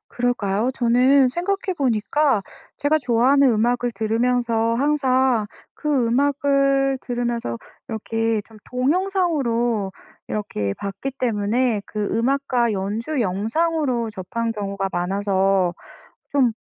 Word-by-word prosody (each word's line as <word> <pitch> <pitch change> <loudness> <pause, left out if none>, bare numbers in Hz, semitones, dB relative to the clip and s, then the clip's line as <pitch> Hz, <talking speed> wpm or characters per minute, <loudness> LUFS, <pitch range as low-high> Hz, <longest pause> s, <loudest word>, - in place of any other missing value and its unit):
그럴까요? 240 -2 0
저는 255 +3 +4
생각해 375 +6 -2
보니까 260 -1 +1 0.3
제가 300 +2 +2
좋아하는 260 +1 +3
음악을 240 +2 +1
들으면서 230 0 +1
항상 260 -4 +2 0.3
그 285 -5 0
음악을 275 +1 +2
들으면서 240 - -2 0.3
이렇게 225 0 -1
좀 220 -1 -15
동영상으로 255 - 0 0.4
이렇게 105 - -2
봤기 200 +7 -5
때문에 225 0 0
그 210 -1 -3
음악과 245 0 +1
연주 215 +9 -2
영상으로 235 - 0
접한 225 +4 -3
경우가 200 -2 -3
많아서 190 0 +1 0.6
좀 265 -5 +3
240 Hz, 255 characters per minute, -22 LUFS, 215-275 Hz, 0.6 s, 저는